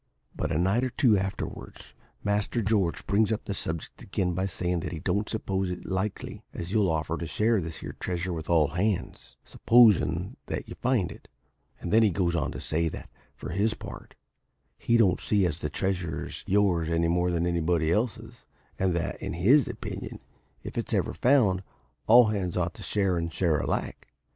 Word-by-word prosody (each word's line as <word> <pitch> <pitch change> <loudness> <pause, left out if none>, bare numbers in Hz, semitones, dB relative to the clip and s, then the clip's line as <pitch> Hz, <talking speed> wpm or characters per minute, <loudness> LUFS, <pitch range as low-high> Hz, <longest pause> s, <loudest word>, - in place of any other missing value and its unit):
"But - - -2
a - - +1
night 95 +8 +2
or 130 - 0
two 120 -3 +3
afterwards, 95 0 -5 0.3
Master 105 +3 0
George 100 -5 0
brings 105 +2 +2
up 110 - -2
the 100 - -3
subject 80 -4 -5
again 95 -2 -1
by 95 +2 -1
sayin' 90 -1 -2
that - - -5
he 85 - -5
don't 100 +6 -1
suppose 95 -4 -2
it's 90 - -6
likely 95 +2 -3
as 85 +1 -5
you'll 105 -3 +3
offer 80 +1 -1
to 85 - -4
share 110 +4 +1
this 80 -1 -6
here - - -7
treasure 90 0 -2
with 80 -1 -6
all 80 -4 +4
hands, 95 +2 -2
supposin' 100 -7 +3
that - - -4
you - - -7
find 120 -8 0
it. - - -13 0.5
And 85 - -4
then 110 - +6
he 110 - +5
goes 85 -2 0
on 70 -6 -1
to - - -6
say 80 +1 0
that, - - -9 0.2
for - - -7
his 105 +5 +1
part, - - -10 0.6
he 120 - +2
don't 100 -6 +3
see 100 -3 +2
as 80 -2 -1
the 75 - -3
treasure 90 0 -2
is - - -8
yours 95 -5 +2
any 85 0 +1
more 90 +1 +1
than 85 -1 0
it's 90 - +1
anybody 85 -1 +1
else's, 110 +6 -2 0.3
and 95 -2 +1
that, 85 - -3
in - - -4
his 115 - +4
opinion, - - -6 0.4
if - - -4
it's - - -2
ever - - 0
found, 120 -9 +3 0.5
all 120 0 +7
hands 95 -5 -2
ought 85 -1 0
to - - -12
share 95 -4 0
and 85 0 -3
share 80 -3 +1
alike. - - -3
95 Hz, 195 wpm, -27 LUFS, 85-105 Hz, 0.6 s, all